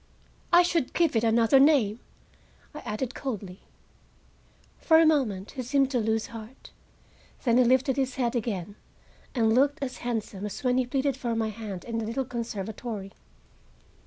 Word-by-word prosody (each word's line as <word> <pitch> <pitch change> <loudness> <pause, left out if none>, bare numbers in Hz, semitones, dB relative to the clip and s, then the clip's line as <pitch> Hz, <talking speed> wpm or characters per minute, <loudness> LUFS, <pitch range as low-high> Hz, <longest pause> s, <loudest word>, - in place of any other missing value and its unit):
"I 350 0 +7
should 335 -6 0
give 335 -7 +2
it 225 - +2
another 230 +3 +4
name," 265 -7 +4 0.7
I 300 - -7
added 245 +2 -4
coldly. 200 -9 -5 1.2
For 320 - +5
a 325 - +6
moment 235 -11 +1
he 260 - -5
seemed 270 +2 +1
to 250 - +1
lose 220 0 0
heart, 225 +3 -11 0.7
then 240 -1 +3
he - - +6
lifted 260 +2 +2
his 265 -1 -1
head 245 -2 -1
again, 205 -4 -3 0.6
and 225 -3 +3
looked 280 +4 +3
as 255 -2 -5
handsome 220 -5 -4
as 205 - -8
when 250 0 +2
he 255 - 0
pleaded 270 +1 0
for 240 -3 -2
my 220 -1 0
hand 210 -4 -7
in 230 -1 -3
the 225 - -3
little 255 +4 -2
conservatory. 220 -3 -5
240 Hz, 160 wpm, -27 LUFS, 220-270 Hz, 1.2 s, I